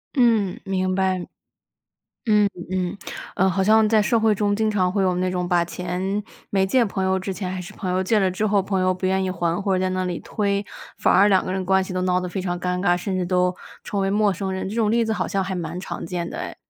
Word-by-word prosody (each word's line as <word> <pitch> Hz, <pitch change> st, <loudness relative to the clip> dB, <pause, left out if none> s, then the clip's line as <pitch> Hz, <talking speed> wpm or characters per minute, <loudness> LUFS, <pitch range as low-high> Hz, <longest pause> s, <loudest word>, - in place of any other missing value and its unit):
嗯， 225 Hz, -7 st, +3 dB
明 185 Hz, -1 st, -1 dB
白。 185 Hz, -1 st, 0 dB, 1.0 s
嗯， 210 Hz, -2 st, +4 dB, 0.2 s
嗯。 185 Hz, -1 st, -1 dB, 0.4 s
呃， 190 Hz, -, +3 dB
好 190 Hz, +1 st, +1 dB
像 215 Hz, +2 st, +5 dB
在 215 Hz, -1 st, +4 dB
社 230 Hz, +2 st, +2 dB
会 220 Hz, -1 st, +3 dB
中 205 Hz, 0 st, +1 dB
经 220 Hz, +1 st, +1 dB
常 185 Hz, -3 st, +1 dB
会 200 Hz, 0 st, +1 dB
有 185 Hz, -1 st, +2 dB
那 185 Hz, +1 st, 0 dB
种 180 Hz, -1 st, -2 dB
把 175 Hz, -1 st, +3 dB
钱 180 Hz, +4 st, -3 dB, 0.3 s
没 190 Hz, -1 st, +2 dB
借 245 Hz, +5 st, +3 dB
朋 195 Hz, -2 st, -3 dB
友 190 Hz, 0 st, +2 dB
之 190 Hz, +1 st, -4 dB
前 185 Hz, -1 st, -4 dB
还 185 Hz, 0 st, -4 dB
是 185 Hz, +4 st, -10 dB
朋 195 Hz, -3 st, -4 dB
友， 185 Hz, +1 st, +1 dB
借 215 Hz, +4 st, +2 dB
了 190 Hz, -2 st, +2 dB
之 195 Hz, +4 st, -1 dB
后 205 Hz, -1 st, +2 dB
朋 190 Hz, 0 st, -1 dB
友 185 Hz, 0 st, +3 dB
不 185 Hz, +1 st, -3 dB
愿 190 Hz, 0 st, +1 dB
意 185 Hz, -, -1 dB
还， 170 Hz, -1 st, -1 dB
或 195 Hz, -1 st, +1 dB
者 185 Hz, -, +1 dB
在 185 Hz, -, +1 dB
那 185 Hz, 0 st, -1 dB
里 180 Hz, -2 st, -2 dB
推， 200 Hz, -1 st, -1 dB, 0.3 s
反 -, -, +3 dB
而 200 Hz, +3 st, +6 dB
两 190 Hz, -2 st, +3 dB
个 -, -, -4 dB
人 190 Hz, -, -1 dB
的 -, -, -6 dB
关 190 Hz, +1 st, +3 dB
系 185 Hz, -, -6 dB
都 185 Hz, -, -1 dB
闹 180 Hz, 0 st, +2 dB
得 180 Hz, -, -4 dB
非 185 Hz, +1 st, -4 dB
常 175 Hz, -1 st, -2 dB
尴 180 Hz, 0 st, -1 dB
尬， 175 Hz, -2 st, +3 dB
甚 185 Hz, +2 st, -3 dB
至 185 Hz, -, 0 dB
都 180 Hz, 0 st, +1 dB, 0.3 s
成 200 Hz, -, -2 dB
为 195 Hz, 0 st, +1 dB
陌 205 Hz, 0 st, +3 dB
生 190 Hz, +1 st, -3 dB
人。 190 Hz, 0 st, -3 dB
这 205 Hz, -, -5 dB
种 225 Hz, -2 st, +2 dB
例 230 Hz, +1 st, +3 dB
子 220 Hz, -, -1 dB
好 -, -, -1 dB
像 195 Hz, -, 0 dB
还 190 Hz, 0 st, -3 dB
蛮 170 Hz, -1 st, -4 dB
常 190 Hz, -, -6 dB
见 170 Hz, 0 st, -3 dB
的 -, -, -7 dB
哎。 -, -, -5 dB
190 Hz, 290 characters per minute, -23 LUFS, 180-205 Hz, 1.0 s, 而